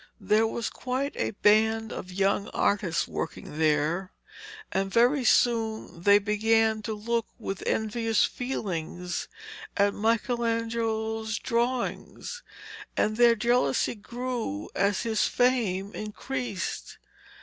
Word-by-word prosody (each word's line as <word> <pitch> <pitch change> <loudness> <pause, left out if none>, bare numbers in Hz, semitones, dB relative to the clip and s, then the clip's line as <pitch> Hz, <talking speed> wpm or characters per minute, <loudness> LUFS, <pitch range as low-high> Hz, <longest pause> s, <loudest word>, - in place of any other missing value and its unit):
There 220 +1 +3
was 230 +1 -3
quite 260 +3 -3
a - - -1
band 220 +1 +3
of 185 - -7
young 195 +2 +1
artists 200 -5 +1
working 150 - -5
there, 160 +4 +1 0.6
and 195 0 -1
very 245 +6 +4
soon 225 -7 +1
they 200 +3 +6
began 220 +1 +2
to 220 0 -4
look 230 +2 -1
with 195 -5 -5
envious 225 0 +1
feelings 180 -8 -4 0.5
at 200 0 +3
Michelangelo's 225 -1 -1
drawings, 250 - -2 0.6
and 215 +1 +2
their 240 0 +6
jealousy 240 +3 +2
grew 235 - -4
as 200 0 +1
his 220 -2 +1
fame 215 -6 +1
increased. 215 -1 -4
220 Hz, 105 wpm, -27 LUFS, 200-235 Hz, 0.6 s, they